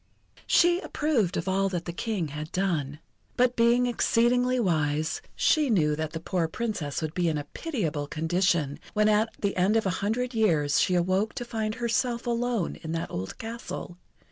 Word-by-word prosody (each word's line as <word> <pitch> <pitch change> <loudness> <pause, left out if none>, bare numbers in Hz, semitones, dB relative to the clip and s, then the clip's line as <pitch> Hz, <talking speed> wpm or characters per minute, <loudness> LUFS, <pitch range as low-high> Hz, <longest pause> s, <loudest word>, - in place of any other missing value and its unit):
She 345 +1 +4
approved 260 - 0
of - - -3
all 195 +1 +1
that 175 -3 -3
the 170 - -4
King 190 -5 -2
had 150 +2 -6
done. 160 -7 -1 0.4
But 250 0 +3
being 235 +1 +4
exceedingly 245 +1 +2
wise, 155 -5 0
she 305 -3 +3
knew 155 -9 +3
that 155 0 -4
the 160 - -3
poor 170 0 -1
Princess 165 -7 -3
would 155 0 -3
be 175 -1 +1
in 155 - -1
a 145 - -3
pitiable 160 - -3
condition 160 -2 0 0.2
when 210 0 +4
at 215 +1 +3
the 200 -1 -1
end 185 +4 +2
of 220 - 0
a 190 - +1
hundred 245 +5 -1
years 160 -10 +2
she 185 - +2
awoke 185 +5 +1
to 245 - -4
find 220 -2 -2
herself 235 0 -1
alone 240 -4 -1
in 160 0 -6
that 165 - -3
old 95 +1 -5
castle. 225 -6 -7
195 Hz, 180 wpm, -27 LUFS, 160-235 Hz, 0.4 s, She